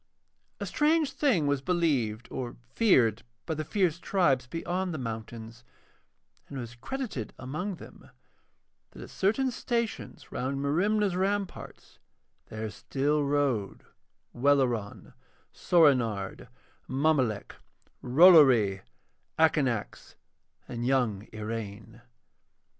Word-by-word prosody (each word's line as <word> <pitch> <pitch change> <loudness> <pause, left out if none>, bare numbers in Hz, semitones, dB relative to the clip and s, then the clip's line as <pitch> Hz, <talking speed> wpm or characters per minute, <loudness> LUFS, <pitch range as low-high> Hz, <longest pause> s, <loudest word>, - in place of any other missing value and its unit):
A - - -3
strange 305 0 +2
thing 235 - +1
was 145 -1 0
believed 135 -10 0
or 125 -2 -5 0.2
feared 120 - +3 0.2
by 160 - -2
the 155 0 -3
fierce 175 -1 0
tribes 145 -11 +1
beyond 175 +4 -3
the - - -3
mountains, 115 -1 -7 0.8
and 140 - -8
it - - -3
was 120 0 -8
credited 135 - -5
among 175 +10 -4
them - - -14 0.8
that - - -11
at - - -12
certain 240 +7 +1
stations 235 -2 -4
round 135 +2 -3
Merimna's 190 +7 +1
ramparts 195 +1 -3 0.5
there 110 0 -5
still 145 +5 -1
rode 140 -8 -1 0.5
Welleran, 125 -5 0 0.4
Soorenard, 125 - +2 0.4
Mommolek, 130 -6 0 0.5
Rollory, 130 - +6 0.6
Akanax, 135 -9 0 0.5
and 120 0 -5
young 120 -6 0
Iraine. 110 +1 -7
140 Hz, 100 wpm, -28 LUFS, 115-175 Hz, 0.8 s, Rollory